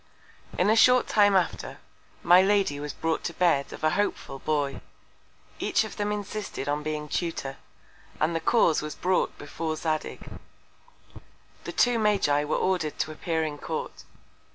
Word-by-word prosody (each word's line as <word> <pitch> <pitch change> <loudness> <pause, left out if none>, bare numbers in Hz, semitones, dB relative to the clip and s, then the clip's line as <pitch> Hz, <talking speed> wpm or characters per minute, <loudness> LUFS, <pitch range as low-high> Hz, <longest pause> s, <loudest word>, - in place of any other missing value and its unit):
In - - +2
a - - +4
short 250 +2 +6
Time 205 -2 +4
after, 185 -2 -1 0.5
my 175 +2 +7
Lady 195 -7 +2
was 145 0 -4
brought 165 +2 -2
to 170 - -3
Bed 165 -6 +2
of - - -10
a 155 - +3
hopeful 175 -7 -2
Boy. 145 -2 -1 0.8
Each - - +1
of - - -8
them 205 0 -1
insisted 205 -7 -5
on 145 +1 0
being 150 0 -4
Tutor, 150 -4 -3 0.6
and 160 +2 +1
the - - +1
Cause 165 -2 +3
was 150 0 -6
brought 185 0 0
before 160 -1 -4
Zadig. 155 -1 -3 1.4
The - - -4
two 245 -2 +2
Magi 195 -9 +2
were 150 - 0
order'd 180 -5 -1
to 155 - -2
appear 160 +1 -2
in 150 -2 -4
Court. - - -5
165 Hz, 155 wpm, -26 LUFS, 150-200 Hz, 1.4 s, my